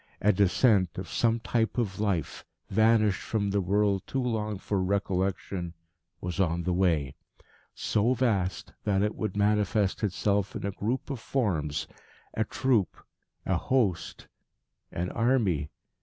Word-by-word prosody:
A 105 Hz, +1 st, +4 dB
descent 100 Hz, -1 st, +3 dB
of 95 Hz, -1 st, -5 dB
some 115 Hz, 0 st, +1 dB
type 115 Hz, 0 st, 0 dB
of 105 Hz, -6 st, -1 dB
life, 100 Hz, -8 st, -1 dB, 0.3 s
vanished 110 Hz, -1 st, +3 dB
from 100 Hz, -3 st, -1 dB
the 100 Hz, 0 st, +1 dB
world 100 Hz, +1 st, +2 dB
too 135 Hz, -1 st, -1 dB
long 110 Hz, -4 st, -1 dB
for 100 Hz, 0 st, -1 dB
recollection, 95 Hz, -2 st, -1 dB, 0.4 s
was 90 Hz, +1 st, -4 dB
on 85 Hz, -2 st, +1 dB
the 90 Hz, +1 st, 0 dB
way, 80 Hz, -7 st, +1 dB, 0.6 s
so 115 Hz, +4 st, +1 dB
vast 100 Hz, -8 st, 0 dB
that 100 Hz, -2 st, +2 dB
it 105 Hz, -, 0 dB
would 105 Hz, -2 st, -3 dB
manifest 105 Hz, -1 st, +1 dB
itself 100 Hz, 0 st, 0 dB
in -, -, -4 dB
a 100 Hz, -, -1 dB
group 115 Hz, +9 st, -3 dB
of 135 Hz, -, -4 dB
forms, 90 Hz, -, -1 dB, 0.5 s
a 110 Hz, -, +1 dB
troop, 120 Hz, -4 st, +1 dB, 0.5 s
a 95 Hz, -, +1 dB
host, 105 Hz, -3 st, -1 dB, 0.6 s
an 90 Hz, +1 st, -3 dB
army. 105 Hz, -, +1 dB
100 Hz, 140 wpm, -28 LUFS, 95-110 Hz, 0.6 s, A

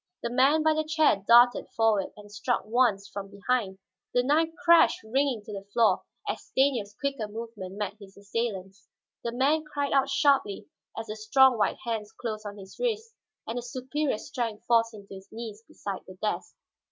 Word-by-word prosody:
The 235 Hz, -, -2 dB
man 275 Hz, +5 st, +4 dB
by 315 Hz, 0 st, +4 dB
the 310 Hz, 0 st, 0 dB
chair 310 Hz, -10 st, +2 dB
darted 240 Hz, +1 st, +6 dB
forward 220 Hz, -4 st, +3 dB
and 205 Hz, 0 st, -13 dB
struck 235 Hz, +3 st, -1 dB
once, 215 Hz, -3 st, +2 dB
from 200 Hz, -1 st, -7 dB
behind. 200 Hz, -1 st, -1 dB, 0.4 s
The 245 Hz, -, +4 dB
knife 310 Hz, +5 st, +3 dB, 0.2 s
crashed 340 Hz, -1 st, +6 dB
ringing 250 Hz, 0 st, 0 dB
to 210 Hz, -, -9 dB
the 195 Hz, 0 st, -7 dB
floor 230 Hz, 0 st, +3 dB, 0.3 s
as -, -, -2 dB
Stanief's 245 Hz, -7 st, 0 dB
quicker 275 Hz, -6 st, -2 dB
movement 210 Hz, -3 st, -7 dB
met 205 Hz, 0 st, -3 dB
his 195 Hz, -1 st, -14 dB
assailant's. 200 Hz, -3 st, -4 dB, 0.4 s
The 235 Hz, -, -2 dB
man 280 Hz, +6 st, +2 dB
cried 285 Hz, -2 st, -2 dB
out 275 Hz, 0 st, +3 dB
sharply 270 Hz, -8 st, +2 dB, 0.3 s
as 225 Hz, -, -4 dB
the 215 Hz, -1 st, -6 dB
strong 255 Hz, +4 st, +5 dB
white 215 Hz, -, +1 dB
hands 220 Hz, -3 st, -3 dB
closed 215 Hz, -3 st, -5 dB
on 205 Hz, 0 st, -8 dB
his 195 Hz, -1 st, -12 dB
wrists 455 Hz, -2 st, -2 dB, 0.3 s
and 230 Hz, +2 st, -3 dB
the -, -, -5 dB
superior 260 Hz, +2 st, -2 dB
strength 230 Hz, -3 st, -4 dB
forced 230 Hz, -1 st, +3 dB
him 205 Hz, -1 st, -12 dB
to 195 Hz, -, -12 dB
his 190 Hz, 0 st, -12 dB
knees 225 Hz, -2 st, -7 dB
beside 195 Hz, -2 st, -6 dB
the 185 Hz, -, -11 dB
desk. 210 Hz, +3 st, -3 dB
230 Hz, 185 wpm, -28 LUFS, 205-270 Hz, 0.4 s, darted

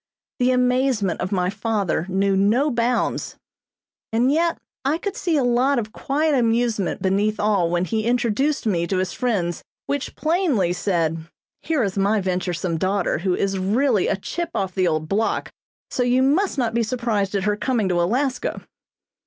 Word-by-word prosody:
The 250 Hz, 0 st, +3 dB
amazement 250 Hz, -6 st, +1 dB
of 185 Hz, -, -3 dB
my 180 Hz, -2 st, +1 dB
father 200 Hz, -5 st, -1 dB
knew 195 Hz, +1 st, +1 dB
no 225 Hz, +10 st, +3 dB
bounds, 240 Hz, +1 st, 0 dB, 0.8 s
and 240 Hz, +4 st, +2 dB
yet 335 Hz, +2 st, +1 dB, 0.3 s
I 280 Hz, +4 st, +1 dB
could 400 Hz, +3 st, -4 dB
see 340 Hz, -8 st, 0 dB
a 275 Hz, -, +2 dB
lot 250 Hz, +3 st, +2 dB
of 220 Hz, -2 st, -2 dB
quiet 300 Hz, +5 st, 0 dB
amusement 230 Hz, -5 st, +1 dB
beneath 205 Hz, +3 st, +1 dB
all 200 Hz, -5 st, +2 dB
when 175 Hz, +1 st, 0 dB
he 220 Hz, +2 st, -1 dB
introduced 245 Hz, +4 st, +1 dB
me 170 Hz, -5 st, +1 dB
to 190 Hz, -, -1 dB
his 185 Hz, -1 st, -1 dB
friends, 190 Hz, -9 st, -1 dB, 0.2 s
which 285 Hz, -1 st, -3 dB
plainly 310 Hz, -, +1 dB
said: 165 Hz, -3 st, -1 dB, 0.3 s
"Here 315 Hz, -6 st, 0 dB
is 195 Hz, -1 st, -2 dB
my 205 Hz, +2 st, +2 dB
venturesome 180 Hz, -2 st, -2 dB
daughter, 190 Hz, -3 st, 0 dB
who 180 Hz, +1 st, 0 dB
is 195 Hz, -1 st, -1 dB
really 215 Hz, +3 st, +2 dB
a -, -, +1 dB
'chip 340 Hz, -, -4 dB
off 190 Hz, -1 st, -1 dB
the 185 Hz, -1 st, +1 dB
old 155 Hz, -1 st, -1 dB
block,' 215 Hz, +6 st, -1 dB, 0.4 s
so -, -, -1 dB
you 250 Hz, +1 st, +3 dB
must 310 Hz, +7 st, +2 dB
not 235 Hz, -4 st, 0 dB
be 235 Hz, -, +1 dB
surprised 220 Hz, -4 st, -1 dB
at 195 Hz, -, 0 dB
her 210 Hz, 0 st, +1 dB
coming 225 Hz, -2 st, 0 dB
to 175 Hz, -1 st, +2 dB
Alaska." 255 Hz, +8 st, -1 dB
215 Hz, 170 wpm, -22 LUFS, 190-255 Hz, 0.8 s, The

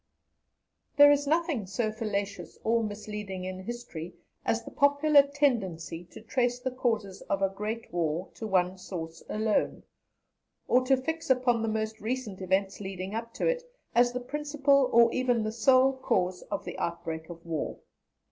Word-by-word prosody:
There 290 Hz, 0 st, +9 dB
is 285 Hz, 0 st, +2 dB
nothing 310 Hz, -, +1 dB
so 215 Hz, +3 st, -1 dB
fallacious 200 Hz, -5 st, -4 dB
or 230 Hz, +1 st, +2 dB
misleading 210 Hz, -2 st, -5 dB
in 185 Hz, 0 st, -5 dB
history 185 Hz, -8 st, -6 dB, 0.3 s
as 225 Hz, -, 0 dB
the -, -, -8 dB
popular 285 Hz, +1 st, +5 dB
tendency 215 Hz, -, -1 dB
to 175 Hz, -, -13 dB
trace 245 Hz, +2 st, 0 dB
the 255 Hz, +1 st, -3 dB
causes 225 Hz, -6 st, -1 dB
of 195 Hz, 0 st, +1 dB
a 195 Hz, -, +3 dB
great 215 Hz, +4 st, -5 dB
war 170 Hz, +1 st, -1 dB
to 220 Hz, -, -6 dB
one 185 Hz, -1 st, +1 dB
source 165 Hz, -3 st, -6 dB
alone, 215 Hz, 0 st, 0 dB, 0.8 s
or 255 Hz, +1 st, +4 dB
to 270 Hz, 0 st, +5 dB
fix 320 Hz, +4 st, -4 dB
upon 250 Hz, -3 st, +3 dB
the 225 Hz, -, -1 dB
most 220 Hz, 0 st, -2 dB
recent 220 Hz, -4 st, -3 dB
events 190 Hz, +1 st, 0 dB
leading 190 Hz, 0 st, -5 dB
up 230 Hz, +1 st, -4 dB
to -, -, -1 dB
it, -, -, +1 dB, 0.3 s
as 240 Hz, 0 st, +5 dB
the 250 Hz, -, -3 dB
principal 280 Hz, 0 st, +2 dB
or 235 Hz, 0 st, +6 dB
even 245 Hz, -3 st, +1 dB
the 215 Hz, -, -1 dB
sole 255 Hz, +4 st, +4 dB
cause 185 Hz, -7 st, 0 dB
of -, -, -3 dB
the -, -, -6 dB
outbreak 165 Hz, -1 st, -4 dB
of 170 Hz, -1 st, -10 dB
war. 160 Hz, -3 st, -3 dB
220 Hz, 165 wpm, -29 LUFS, 190-255 Hz, 0.8 s, There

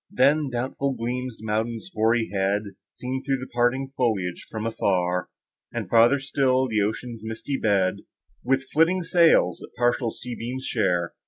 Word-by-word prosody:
Then, 140 Hz, +3 st, +3 dB
doubtful 130 Hz, +2 st, -2 dB
gleams 125 Hz, 0 st, -3 dB
the 110 Hz, -, -11 dB
mountain's 115 Hz, -, -2 dB
hoary 115 Hz, -, +1 dB
head, 100 Hz, +2 st, +1 dB, 0.2 s
Seen 130 Hz, +1 st, -5 dB
through 135 Hz, -1 st, 0 dB
the 130 Hz, 0 st, -8 dB
parting 125 Hz, +3 st, +1 dB
foliage 100 Hz, -8 st, -1 dB
from 110 Hz, 0 st, -4 dB
afar; 90 Hz, -5 st, 0 dB, 0.4 s
And, -, -, -4 dB
farther 120 Hz, +4 st, +6 dB
still, 130 Hz, -1 st, +1 dB
the 110 Hz, -3 st, +1 dB
ocean's 110 Hz, +2 st, -3 dB
misty 110 Hz, +5 st, -4 dB
bed, 95 Hz, -3 st, +2 dB, 0.5 s
With 135 Hz, +2 st, +1 dB
flitting 170 Hz, +4 st, +3 dB
sails, 165 Hz, -, +4 dB
that -, -, -12 dB
partial 120 Hz, 0 st, +1 dB
sunbeams 125 Hz, +2 st, -6 dB
share. 90 Hz, -6 st, 0 dB
120 Hz, 150 wpm, -25 LUFS, 110-130 Hz, 0.5 s, farther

